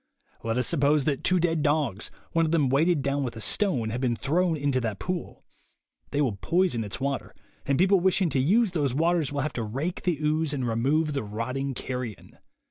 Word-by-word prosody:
Let 115 +1 -1
us 125 - +1
suppose 145 -2 +2
that 140 -3 -1
two 185 0 +3
dead 165 -2 +1
dogs, 145 - 0 0.2
one 165 - +2
of - - -2
them 150 -6 +3
weighted 150 +2 +2
down 140 +1 0
with 120 -3 -4
a - - -7
stone, 125 - 0
have 120 +3 -3
been 125 -3 +1
thrown 160 - +1
into 140 -3 0
that 110 -4 -2
pool. 180 -2 -5 0.7
They 145 - 0
will 120 -9 0
poison 170 - +1
its 105 +2 -6
water, 140 0 -3 0.3
and 140 0 +2
people 190 +2 +4
wishing 185 -1 +2
to 135 - +1
use 200 - +3
those 145 -7 0
waters 165 -2 +1
will 145 -1 -1
have 150 +1 -2
to 120 - -2
rake 135 +11 -3
the 175 -4 0
ooze 155 0 0
and 130 -4 -1
re 115 - 0
move 150 +7 +1
the 140 - -1
rotting 130 +6 -3
carrion. 125 -5 -6
140 Hz, 210 wpm, -27 LUFS, 125-165 Hz, 0.7 s, people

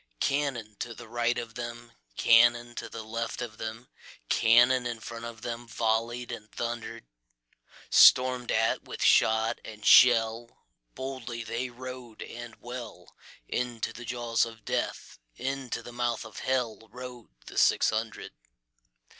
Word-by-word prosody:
Cannon 135 -7 -1
to 120 -1 -5
right 120 +1 0
of 115 -1 -5
them, 120 0 -7 0.3
Cannon 120 +1 +5
to - - -6
left 115 +1 -4
of 110 -2 -6
them, 115 +2 -6 0.4
Cannon 120 +2 +5
in 120 -2 -4
front 115 +1 -7
of 115 -1 -8
themVolley'd 115 0 -2
and 110 -2 -8
thunder'd; 115 - -5 0.9
Storm'd 125 -1 +6
at 115 +1 +2
with - - -5
shot 110 0 +4
and 105 -1 -10
shell, 115 -1 +5 0.3
Boldly 130 -3 -5
they 115 +3 -3
rode 125 -2 -9
and 120 -1 -9
well, 120 -2 -9 0.3
Into 120 -2 -2
the 120 - -9
jaws 120 -1 0
of 115 -2 -7
Death, - - -3 0.2
Into 135 - -4
the 120 - -10
mouth 120 -1 -1
of 110 - -9
HellRode 125 -1 -4 0.2
the - - -3
six - - +4
hundred. 110 0 -4
120 Hz, 130 wpm, -28 LUFS, 115-120 Hz, 0.9 s, Storm'd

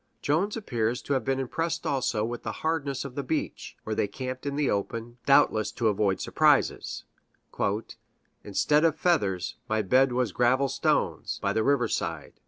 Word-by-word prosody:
Jones 185 +10 +1
appears 120 - -1
to 145 - -1
have 135 - 0
been 135 0 0
impressed 165 +5 -2
also 125 -6 0
with 120 +1 -5
the - - -4
hardness 145 -4 -1
of 135 - -7
the 140 - -2
beach, 150 +4 -4
where 110 - -3
they 105 - +1
camped 130 +5 -6
in 140 - -2
the 145 -1 +1
open, 115 +4 -3
doubtless 110 -6 +4
to 115 -3 +1
avoid 100 -2 +1
surprises: - - +2 1.4
"Instead 150 +10 +2
of 160 -2 +3
feathers, 100 - 0
my 110 0 +1
bed 130 +6 +4
was 125 -3 0
gravel 130 +5 +2
stones, - - 0
by - - +1
the 110 - +1
river 140 -1 +2
side 80 -4 -4
130 Hz, 170 wpm, -27 LUFS, 110-140 Hz, 1.4 s, doubtless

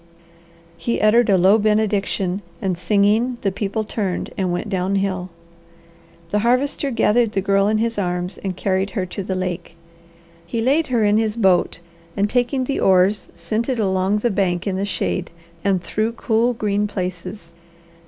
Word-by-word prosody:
He 235 - -1
uttered 220 +2 +4
a 195 - +5
low 190 +5 +5
benediction, 205 -3 0 0.2
and 190 -2 -1
singing, 210 +7 +2
the 195 - 0
people 205 +2 -2
turned 200 -4 -3
and 185 -2 -1
went 175 +4 -2
downhill. 190 -1 -1 1.0
The 210 - +2
Harvester 255 +5 +1
gathered 230 -2 +2
the - - +1
Girl 195 0 +2
in 215 +1 +2
his 230 -1 -1
arms 180 0 -2
and 190 -2 -4
carried 190 0 0
her 185 - 0
to 185 +3 -5
the 190 0 -3
lake. 180 -2 -4 0.7
He 170 +7 -4
laid 285 +7 +2
her 240 -4 +1
in 205 +1 +3
his 220 -1 0
boat 185 -6 +2 0.4
and 200 +1 +2
taking 245 +3 0
the 275 +2 -2
oars 190 +2 +3
sent 230 +3 -2
it 255 - 0
along 190 -1 +1
the 235 +2 0
bank 185 -2 0
in 195 -2 -1
the 195 +1 -1
shade, 185 -2 -2 0.3
and 195 -3 +1
through 220 +4 -1
cool, 235 +1 +1
green 210 -1 0
places. 180 -2 -6
200 Hz, 165 wpm, -21 LUFS, 185-220 Hz, 1.0 s, a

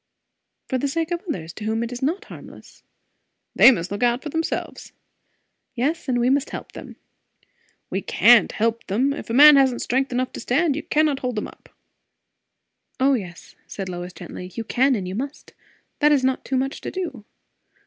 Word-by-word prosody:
"For 260 - -1
the 280 - -1
sake 325 +4 -2
of 345 0 -2
others, 165 - -5
to 215 - -9
whom 220 +1 -1
it 235 - -5
is 245 - -6
not 345 +10 -1
harmless." - - -13 0.7
"They - - +9
must 180 -8 0
look 205 - -4
out 240 +1 +1
for 305 - -5
themselves." 325 +2 -4 0.8
"Yes, 295 +7 -1
and 245 -1 +1
we 240 - +2
must 275 +2 +1
help - - -8
them." - - -10 1.0
"We - - -1
can't 235 -1 +5
help 230 +1 -1
them. 255 +8 +1
If 285 - -8
a - - -2
man 295 +1 +9
hasn't 265 -3 +2
strength 265 +2 0
enough 255 +1 -2
to - - -7
stand, 285 +5 +1
you 305 - -3
cannot 300 -3 +1
hold 250 -4 -3
him 210 - -2
up." - - -17 1.3
"O 270 +2 +4
yes," 180 -8 -6
said 195 -2 -6
Lois 175 0 -6
gently, 180 0 -9
"you 230 - -3
can 260 +4 +2
and 190 -4 -4
you 185 - -5
must. 275 +7 -6 0.5
That 300 0 +4
is 280 -3 +3
not 260 0 -1
much 265 +1 -1
to - - -5
do! 330 - -5
255 Hz, 190 wpm, -22 LUFS, 225-285 Hz, 1.3 s, They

